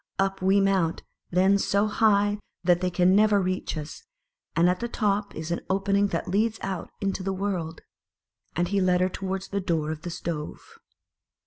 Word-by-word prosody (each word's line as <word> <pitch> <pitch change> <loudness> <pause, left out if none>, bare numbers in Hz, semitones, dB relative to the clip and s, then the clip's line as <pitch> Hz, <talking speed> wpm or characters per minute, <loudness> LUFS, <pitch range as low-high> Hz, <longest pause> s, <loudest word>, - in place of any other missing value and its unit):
Up 195 0 0
we 190 +2 +4
mount, 190 -4 +1 0.3
then, 190 +3 +3
so 200 +1 +2
high 205 -1 +2 0.2
that 175 0 +3
they 185 - +1
can 180 +1 +3
never 210 0 +5
reach 185 -3 -2
us; 155 - -7 0.5
and 170 +2 +4
at 180 0 +1
the 235 - -2
top 205 -3 -1
is 160 +1 -5
an 170 - -1
opening 200 +1 +2
that 170 -4 -3
leads 215 +4 +1
out 190 -3 -4
into 195 -1 -1
the 195 +1 -2
world." 185 -4 -3 0.7
And 175 +1 0
he 200 0 +1
led 180 -1 +3
her 185 - +2
towards 190 +1 -4
the 200 0 -2
door 160 -4 -1
of 155 -1 -6
the 175 - -5
stove. 165 -2 -6
190 Hz, 185 wpm, -26 LUFS, 175-200 Hz, 0.7 s, never